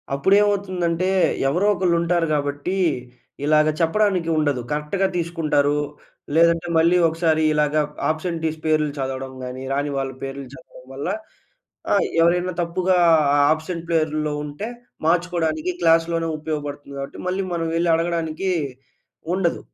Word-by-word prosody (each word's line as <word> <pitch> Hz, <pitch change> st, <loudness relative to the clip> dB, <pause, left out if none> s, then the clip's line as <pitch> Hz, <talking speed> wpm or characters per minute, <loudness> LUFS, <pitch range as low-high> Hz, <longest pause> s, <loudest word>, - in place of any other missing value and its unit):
అప్పుడేమవుతుందంటే 185 Hz, 0 st, +2 dB, 0.4 s
ఎవరో 180 Hz, +8 st, +1 dB
ఒకళ్ళు 175 Hz, -2 st, +1 dB
ఉంటారు 170 Hz, -1 st, +1 dB
గాబట్టి 145 Hz, +4 st, -1 dB, 0.7 s
ఇలాగ 155 Hz, 0 st, +4 dB
చెప్పడానికి 180 Hz, 0 st, +1 dB
ఉండదు. 145 Hz, -5 st, +1 dB
కరెక్ట్‌గా 150 Hz, +6 st, 0 dB
తీసుకుంటారు. 155 Hz, -4 st, +1 dB, 0.6 s
లేదంటే 170 Hz, +1 st, +4 dB
మళ్ళీ 170 Hz, +2 st, +4 dB
ఒకసారి 160 Hz, -1 st, +1 dB
ఇలాగ 150 Hz, 0 st, +1 dB, 0.3 s
ఆబ్సెంటీస్ 160 Hz, 0 st, -2 dB
పేర్లు 155 Hz, -1 st, +2 dB
చదవడం 130 Hz, 0 st, -4 dB
గాని, 125 Hz, +1 st, -6 dB
రాని 145 Hz, +1 st, -1 dB
వాళ్ళ 135 Hz, -1 st, -2 dB
పేర్లు 135 Hz, 0 st, -5 dB
చదవడం 130 Hz, -5 st, -15 dB
వల్ల 140 Hz, -, -4 dB, 0.9 s
ఆహ్, -, -, +3 dB
ఎవరైనా 175 Hz, +2 st, +2 dB
తప్పుగా 180 Hz, +2 st, +1 dB, 0.4 s
ఆ -, -, +4 dB, 0.2 s
ఆబ్సెంట్ 165 Hz, +2 st, -4 dB
ప్లేరులో 155 Hz, -2 st, 0 dB
ఉంటే 150 Hz, +8 st, -6 dB, 0.4 s
మార్చుకోడానికి 170 Hz, -1 st, 0 dB
క్లాస్‌లోనే 165 Hz, 0 st, +2 dB
ఉపయోగపడుతుంది 145 Hz, -2 st, -5 dB
గాబట్టి 140 Hz, 0 st, -7 dB
మళ్ళీ 190 Hz, +1 st, -1 dB
మనం 165 Hz, -1 st, -1 dB
వెళ్లి 170 Hz, +1 st, +1 dB
అడగడానికి 165 Hz, +2 st, -1 dB, 0.8 s
ఉండదు. 180 Hz, -3 st, 0 dB
165 Hz, 120 wpm, -22 LUFS, 150-175 Hz, 0.9 s, ఇలాగ